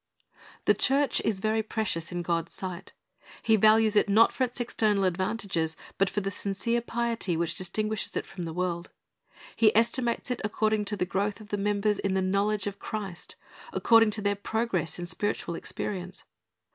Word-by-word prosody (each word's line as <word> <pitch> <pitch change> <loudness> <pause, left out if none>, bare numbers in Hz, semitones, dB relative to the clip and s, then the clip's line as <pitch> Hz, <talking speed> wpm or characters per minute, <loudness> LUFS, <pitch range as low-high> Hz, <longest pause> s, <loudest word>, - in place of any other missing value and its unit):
The - - +6
church 275 +1 +2
is 210 -4 0
very 220 +2 +1
precious 205 -6 -2
in 175 0 -3
God's 170 -1 -2
sight. 185 -2 -6 0.5
He 220 -1 +4
values 215 +1 +5
it, 205 - +4
not 220 +3 +5
for 260 - 0
its 250 -1 -2
external 215 -4 +1
advantages, 185 -3 -1 0.2
but 195 -1 +3
for 205 - -2
the 195 0 -2
sincere 205 +5 -1
piety 230 -7 -1
which 170 0 0
distinp 215 +3 0
uishes 220 - -3
it - - -2
from 180 -3 -7
the 165 - -4
world. 175 0 -2 0.7
He 220 -2 +4
estimates 235 +1 +1
it 250 - -2
according 215 0 0
to 210 +1 -2
the 180 - 0
growth 200 +3 -1
of 215 -1 -13
the 205 - -1
members 205 +1 +1
in 195 -1 0
the 190 - +2
knowledge 200 +2 +1
of 200 -1 -4
Christ, 200 -5 -5 0.4
according 225 -1 +5
to 210 0 -3
their 205 0 +2
progress 200 -6 -1
in 175 - -4
spiritual 175 0 -2
experience. 185 +2 -5
205 Hz, 180 wpm, -28 LUFS, 185-220 Hz, 0.7 s, The